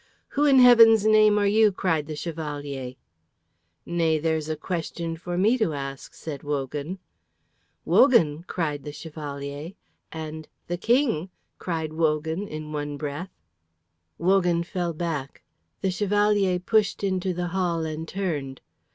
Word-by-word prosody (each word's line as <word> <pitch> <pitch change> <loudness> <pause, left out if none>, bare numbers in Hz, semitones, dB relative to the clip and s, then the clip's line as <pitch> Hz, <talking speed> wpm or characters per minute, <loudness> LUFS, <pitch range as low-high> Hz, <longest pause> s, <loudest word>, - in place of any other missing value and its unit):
"Who, 290 +1 +1
in 275 -2 +6
Heaven's 230 -4 +8
name, 215 -1 +5
are 205 - +2
you?" 210 +1 +4
cried 165 -6 -1
the 155 - -5
Chevalier. 145 -5 -5 0.9
"Nay, 165 -2 +1
there's 160 0 -1
a 155 - -1
question 165 0 -4
for 175 +1 -5
me 220 +7 +3
to 190 -8 +1
ask," 135 -1 -7
said 150 -4 -7
Wogan. 145 +4 -3 0.9
"Wogan!" 170 - +4
cried 150 -5 -2
the 150 - -7
Chevalier, 145 0 -7 0.4
and 155 -1 -7 0.2
"The 175 - -3
King!" 230 - +1 0.3
cried 160 -3 -3
Wogan 160 +4 0
in 155 -2 -7
one 145 -1 -4
breath. 150 +5 -5 0.9
Wogan 175 -1 +2
fell 175 -1 -3
back; 155 -5 -4 0.4
the 190 - +1
Chevalier 205 -1 +2
pushed 205 +2 +1
into 190 -1 0
the 175 0 -3
hall 170 -3 -1
and 160 +1 -5
turned. 150 -9 -3
165 Hz, 135 wpm, -25 LUFS, 150-195 Hz, 0.9 s, Heaven's